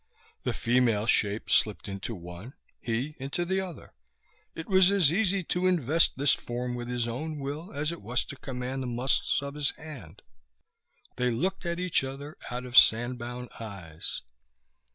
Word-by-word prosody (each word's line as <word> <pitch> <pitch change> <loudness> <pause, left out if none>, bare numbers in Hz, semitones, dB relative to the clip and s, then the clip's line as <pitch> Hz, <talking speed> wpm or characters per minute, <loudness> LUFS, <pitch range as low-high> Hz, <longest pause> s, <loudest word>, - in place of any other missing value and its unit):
The - - -1
female 115 -3 +2
shape 105 -2 +1
slipped 105 -3 +3
into 100 +3 -4
one, 90 +7 -9 0.2
he 125 +6 -2
into 140 +6 -2
the 190 +2 +1
other. 180 -6 -8 0.6
It 165 - -6
was 190 -2 +6
as 185 -7 +4
easy 195 -1 +2
to 180 +2 +1
invest 165 -3 +3
this 140 +1 +4
form 125 +1 -3
with 120 -1 -4
his 120 -1 -1
own 150 +7 -3
will 145 +6 -5
as 150 +3 -1
it 170 - -7
was 120 +5 -1
to 140 - -8
command 130 0 -4
the 130 - -3
muscles 125 +2 +1
of 140 0 -5
his 150 -2 0
hand. 115 - -10 0.9
They 125 0 +2
looked 180 +10 -1
at 170 0 -1
each 180 -5 +2
other 140 +3 -6
out 125 +1 -4
of 125 -1 -7
sandbound 120 +1 +1
eyes. 85 - -5
130 Hz, 165 wpm, -29 LUFS, 120-160 Hz, 0.9 s, was